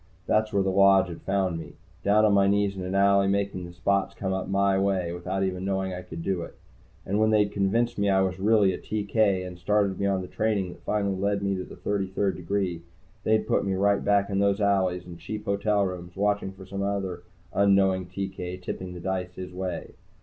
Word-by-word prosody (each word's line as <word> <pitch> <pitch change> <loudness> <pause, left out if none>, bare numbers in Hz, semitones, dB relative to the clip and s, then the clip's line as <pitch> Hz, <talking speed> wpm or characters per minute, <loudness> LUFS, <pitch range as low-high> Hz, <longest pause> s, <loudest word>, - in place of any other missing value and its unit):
That's 110 +1 +1
where 100 -1 +2
the 95 - 0
Lodge 95 -1 +5
had 85 - -8
found 95 -3 0
me, 80 - -9 0.3
down 105 +2 +4
on 105 - +4
my 100 -1 +4
knees 100 0 +2
in 95 - -5
an 90 +1 -3
alley, 100 0 +4
making 100 -2 -1
the - - -10
spots 100 +2 0
come 95 -1 -2
up 95 0 -3
my 100 0 +2
way 95 -3 0
without 90 +2 -2
even 95 -1 -2
knowing 95 -1 -1
I 90 - -5
could 85 -2 -8
do 95 -2 -1
it. - - -8 0.5
And 100 +2 0
when 110 0 +4
they'd 105 -2 +3
convinced 115 +4 0
me 100 0 +2
I 95 0 +4
was 95 0 -2
really 105 -1 +4
a - - -5
TK, 100 -2 0
and 90 -1 -8
started 100 0 +1
me 100 - +1
on 95 -1 +1
the - - -7
training 105 -4 -1
that 90 - -12
finally 100 -2 -1
led 100 +1 0
to 100 -2 -1
the - - -11
Thirty 100 -2 -2
third 95 +1 -1
degree, 90 -1 -2 0.4
they'd 110 0 +2
put - - +2
me 95 -1 -1
right 100 +1 +2
back 100 -1 +2
in 100 - +1
those 100 0 +2
alleys, 95 -3 +1
and 85 -1 -10
cheap 105 +5 -6
hotel 100 0 +1
rooms, 90 -1 -6
watching 100 -1 0
for 95 0 -12
some 100 +1 -5
other 100 -3 -2 0.3
unknowing 95 -2 +3
TK 95 -1 -5
tipping 90 0 -5
the - - -7
dice 90 0 -3
his 90 -1 -7
way. 90 -2 -4
95 Hz, 225 wpm, -26 LUFS, 95-100 Hz, 0.5 s, Lodge